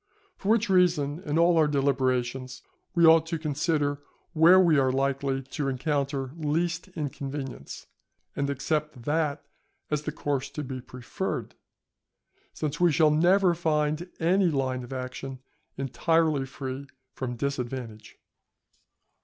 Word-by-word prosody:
For 195 - -4
which 225 0 +3
reason 175 -6 +2
in 150 +2 0
all 170 0 +4
our 155 - +4
deliberations 130 -2 0 0.3
we 170 -1 +5
ought 160 0 +6
to 165 0 -2
consider 150 -1 -1 0.3
where 170 +3 +7
we 165 -6 +5
are 130 -1 +3
likely 135 0 0
to 135 +2 -4
encounter 140 -1 -1
least 165 +3 -1
inconvenience, 135 - -5 0.5
and 140 0 -1
accept 150 -1 -2
that 150 0 -1 0.5
as 150 -1 +1
the 150 - -4
course 140 -2 -2
to 150 - -2
be 130 -1 -6
preferred, 125 0 -5 1.0
since 150 -1 -4
we 175 -1 +5
shall 155 0 +4
never 175 +4 +4
find 155 0 0
any 180 +2 +3
line 130 -4 -1
of 120 - -11
action 130 +1 -5 0.4
entirely 150 +1 +1
free 135 +1 -6 0.3
from 125 -2 -4
disadvantage. 120 -4 -5
145 Hz, 130 wpm, -27 LUFS, 135-160 Hz, 1.0 s, where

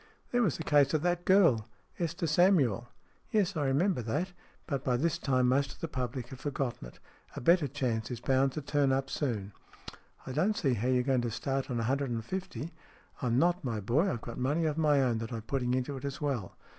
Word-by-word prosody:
" - - -37
There 245 - +2
was 195 - +1
the 160 - -5
case 145 -1 +4
of 155 - 0
that 175 0 0
girl 165 - +4 0.3
Esther 170 +1 -2
Samuel." 150 - +3 0.2
" - - -36
Yes, 200 -2 +2
I 150 -3 0
remember 155 +3 +2
that. 150 - -2 0.3
But 140 -5 -3
by 125 -2 +1
this 170 +5 0
time 130 -5 +2
most 135 +2 +2
of - - -18
the 165 - -3
public 125 -3 -4
have 130 - -9
forgotten 135 - -3
it. - - -15 0.4
A - - -4
better 170 +3 +4
chance 115 -4 -2
is 120 - -4
bound 135 +2 +2
to 150 - -4
turn 145 -1 +2
up 135 0 0
soon." 105 -8 -2 0.4
" - - -22
I - - -5
don't 185 +11 +1
see 135 -5 +2
how 120 +1 -1
you're 125 -1 +3
going 130 -1 +2
to 120 - -1
start 135 +4 -2
on 120 -2 -1
a - - -1
hundred 135 +3 0
and 115 -2 -3
fifty." 185 -1 -5 0.2
" - - -26
I'm 120 -1 +1
not, 175 +5 +2
my 115 -5 -2
boy. 135 - +2
I've 115 - -4
got 120 - -7
money 145 +6 +1
of 155 -2 0
my 150 -3 +3
own 120 -3 +1
that 115 +1 -5
I'm 115 -2 -4
putting 125 +1 -1
into 130 +2 -2
it 130 - -9
as 140 -1 -4
well.' 135 -10 -3
135 Hz, 240 wpm, -31 LUFS, 125-160 Hz, 0.4 s, case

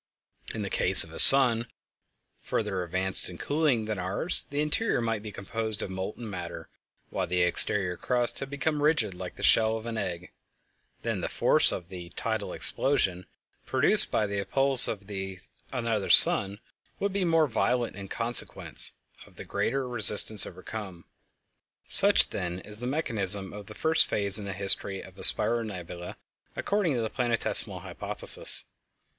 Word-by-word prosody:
In - - -6
the - - -8
case - - +8
of - - -13
a - - +3
sun 120 -4 +7 0.7
further 105 -4 -5
advanced 95 +2 -5
in 90 - -12
cooling 145 - -3
than 105 -2 -6
ours 95 - +1
the 145 - -6
interior 150 - -3
might 115 -2 -4
be 105 - -10
composed 110 +2 -6
of 95 - -8
molten 95 +5 -8
matter 90 -4 -10 0.4
while - - -5
the 90 0 -2
exterior 90 +1 +2
crust 125 -1 +1
had 135 - -8
become 145 +1 -4
rigid 145 -10 -1
like 90 0 -11
the - - -12
shell 110 0 +3
of 110 - -12
an 115 -1 -7
egg; 90 -3 -8 0.7
then - - -5
the - - -6
force - - +3
of 85 -1 -9
the 90 -2 -11
"tidal 110 -2 -5
explosion" 95 -10 0 0.4
produced - - +3
by 110 - -2
the 100 0 -6
appulse 135 +6 -1
of 100 -2 -8 0.6
another 115 -5 -5
sun 100 +1 +3 0.4
would 200 -1 -4
be 200 -1 -3
more 165 -2 0
violent 120 -2 -3
in 100 0 -11
consequence 115 +3 +5 0.3
of - - -24
the - - -12
greater 135 +1 -4
resistance 110 -3 +3
overcome. 95 -3 -11 0.8
Such, - - +4
then, 90 0 -6
is 105 +2 -3
the 125 - -6
mechanism 105 - -1
of 105 -1 -12
the 110 - -13
first 160 +1 +1
phase 100 -1 -2
in 100 - -9
the 100 - -7
history 95 0 +3
of - - -17
a - - -11
spiral 120 0 +4
nebula 90 -4 -10 0.4
according 200 -8 -3
to 120 - -4
the 110 - -6
Planetesimal 120 -3 -3
Hypothesis. - - -1
110 Hz, 160 wpm, -25 LUFS, 95-125 Hz, 0.8 s, case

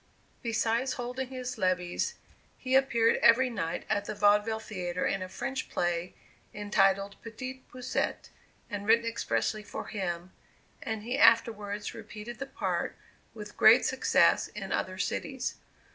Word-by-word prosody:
Besides 230 +2 0
holding 250 +1 -4
his 250 -2 -6
levees, 185 - 0 0.4
he 255 0 -3
appeared 235 -4 +4
every 245 +2 +5
night 165 -8 -3
at 205 - 0
the 215 - -4
Vaudeville 210 +2 +3
Theatre 180 -5 -3
in 195 - 0
a 185 - -5
French 265 +6 -4
play, 175 0 -1 0.4
entitled 200 -1 +1
"Petit 255 +3 -7
Poucet," 255 0 -3 0.4
and 205 -2 -5
written 230 +1 +5
expressly 225 -1 -1
for 210 - -7
him, 180 -3 -4 0.5
and 220 -2 -4
he 245 +4 -2
afterwards 210 -5 +3
repeated 225 +1 -9
the 275 - -4
part - - -2 0.4
with - - -9
great - - +7
success - - +3
in - - -7
other - - -1
cities. - - -3
220 Hz, 135 wpm, -29 LUFS, 200-245 Hz, 0.5 s, great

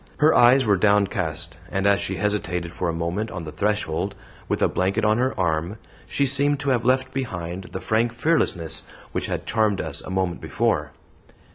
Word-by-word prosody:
Her 155 +2 +5
eyes 125 +2 +6
were 100 -2 +3
downcast, 95 -4 +1
and 95 0 -1
as 100 0 +4
she - - -2
hesitated 90 -5 -1
for 90 -1 -2
a - - +1
moment 85 +6 -2
on 90 -1 -6
the 75 - -7
threshold, 100 -2 -1 0.3
with - - 0
a - - +5
blanket 100 +4 0
on 110 +2 +3
her 130 -4 0
arm, 85 +3 0 0.3
she 140 - +1
seemed 140 +1 +3
to 140 -1 0
have 120 -2 +1
left 130 +1 +1
behind 90 -8 -4
her - - -12
the 95 - -6
frank 115 +2 +1
fearlessness 95 - 0 0.3
which - - -2
had - - -3
charmed 110 -3 +1
us - - -4
a - - -9
moment 95 -2 -1
before. 75 0 0
100 Hz, 190 wpm, -23 LUFS, 85-120 Hz, 0.3 s, eyes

